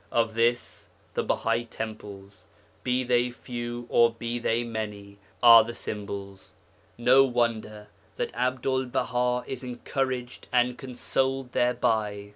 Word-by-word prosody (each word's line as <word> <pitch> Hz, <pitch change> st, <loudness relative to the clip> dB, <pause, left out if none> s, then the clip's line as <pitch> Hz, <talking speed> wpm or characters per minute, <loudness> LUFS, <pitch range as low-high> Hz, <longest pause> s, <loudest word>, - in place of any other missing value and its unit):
Of 115 Hz, -1 st, +1 dB
this 120 Hz, +2 st, 0 dB, 0.2 s
the -, -, 0 dB
Bahai 115 Hz, +1 st, 0 dB
temples 105 Hz, -3 st, -8 dB, 0.4 s
be 125 Hz, 0 st, +1 dB
they 125 Hz, 0 st, +2 dB
few, 120 Hz, -1 st, -6 dB
or 120 Hz, -1 st, +5 dB
be 115 Hz, +1 st, -4 dB
they 115 Hz, 0 st, 0 dB
many 105 Hz, -3 st, -6 dB, 0.2 s
are 115 Hz, -1 st, +10 dB
the 115 Hz, +1 st, -7 dB
symbols. 100 Hz, -2 st, -7 dB, 0.4 s
No 130 Hz, +3 st, +6 dB
wonder 115 Hz, -4 st, -1 dB, 0.3 s
that -, -, -3 dB
Abdul 130 Hz, +2 st, 0 dB
Baha 125 Hz, 0 st, 0 dB
is 130 Hz, -1 st, -5 dB
encouraged 125 Hz, 0 st, -3 dB
and 125 Hz, 0 st, +2 dB
consoled 130 Hz, 0 st, -2 dB
thereby. 110 Hz, -5 st, 0 dB
120 Hz, 120 wpm, -27 LUFS, 110-125 Hz, 0.4 s, are